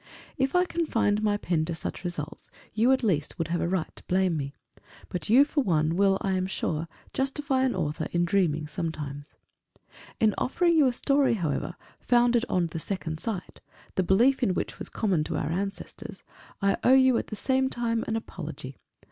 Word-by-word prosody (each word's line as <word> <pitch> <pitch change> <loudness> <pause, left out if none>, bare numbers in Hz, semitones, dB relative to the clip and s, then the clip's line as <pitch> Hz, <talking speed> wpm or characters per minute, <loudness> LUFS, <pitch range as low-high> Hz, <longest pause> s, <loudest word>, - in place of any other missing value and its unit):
If 270 +2 0
I 360 0 +5
confined 230 - 0
my 210 -1 +2
pen 170 -5 0
to 170 0 -3
such 165 - -5
results, 160 -4 -5 0.2
you, 230 +4 +3
at 265 -1 +2
least, 165 -9 0
would 165 -1 -2
have 175 0 0
a - - 0
right 180 -2 -2
to - - -12
blame 185 -2 +2
me. 140 -2 -4 0.5
But 175 -1 -5
you, 260 +6 +7
for 290 0 0
one, 160 - +1
will, 195 0 +4
I 195 - 0
am 185 0 0
sure, 165 -3 -2 0.3
justify 270 0 0
an 255 - 0
author 150 +1 -2
in 175 0 +2
dreaming 170 -5 +1
sometimes. 150 -2 -5 0.8
In 215 -2 +4
offering 340 +6 +2
you 300 -4 +5
a - - +3
story, 275 0 +2
however, 175 -2 -2 0.2
founded 240 -1 +3
on 180 -2 +2
The 165 0 -5
Second 160 -3 -4
Sight, 210 -4 -5 0.3
the - - +1
belief 235 +10 +3
in 195 -7 +2
which - - -3
was - - -5
common 190 -8 0
to 160 -1 -2
our 150 - -2
ancestors, 195 +3 -5 0.4
I 200 - +3
owe 260 - +6
you, 260 -2 +5
at - - -5
the 215 - -5
same 265 +4 +1
time, 230 -2 -1
an 225 - -1
apology. 160 - -7
195 Hz, 190 wpm, -27 LUFS, 165-245 Hz, 0.8 s, you